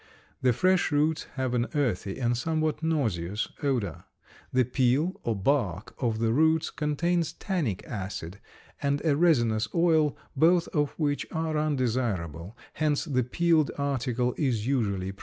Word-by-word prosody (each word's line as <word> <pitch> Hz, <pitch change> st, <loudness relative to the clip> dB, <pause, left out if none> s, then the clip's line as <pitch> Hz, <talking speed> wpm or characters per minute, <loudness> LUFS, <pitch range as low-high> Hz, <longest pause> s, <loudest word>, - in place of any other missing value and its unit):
The 130 Hz, -, +4 dB
fresh 185 Hz, +9 st, +2 dB
roots 150 Hz, +2 st, +1 dB
have 130 Hz, -2 st, -1 dB
an 120 Hz, 0 st, +1 dB
earthy 110 Hz, -9 st, -1 dB
and 120 Hz, -1 st, +1 dB
somewhat 155 Hz, +3 st, -1 dB
nauseous 110 Hz, -, -1 dB
odor. 120 Hz, -, -1 dB, 0.5 s
The 130 Hz, 0 st, +3 dB
peel, 130 Hz, +8 st, +1 dB
or 115 Hz, -, -1 dB
bark, 100 Hz, -, 0 dB
of 115 Hz, -4 st, 0 dB
the 115 Hz, 0 st, +1 dB
roots 160 Hz, +3 st, +3 dB
contains 165 Hz, +2 st, 0 dB
tannic 155 Hz, -, -2 dB
acid 95 Hz, -3 st, -5 dB, 0.4 s
and 140 Hz, +2 st, 0 dB
a 150 Hz, -3 st, +3 dB
resinous 120 Hz, -10 st, +3 dB
oil, 160 Hz, -3 st, +3 dB, 0.2 s
both 170 Hz, +4 st, +4 dB
of 145 Hz, -2 st, 0 dB
which 145 Hz, -3 st, -1 dB
are 160 Hz, -1 st, -2 dB
undesirable; 115 Hz, -, -1 dB, 0.2 s
hence 150 Hz, -2 st, 0 dB
the 135 Hz, -5 st, +1 dB
peeled 160 Hz, +4 st, +2 dB
article 125 Hz, -3 st, 0 dB
is 120 Hz, -7 st, 0 dB
usually 100 Hz, -8 st, 0 dB
preferred. 100 Hz, -, -16 dB
135 Hz, 140 wpm, -27 LUFS, 115-155 Hz, 0.5 s, The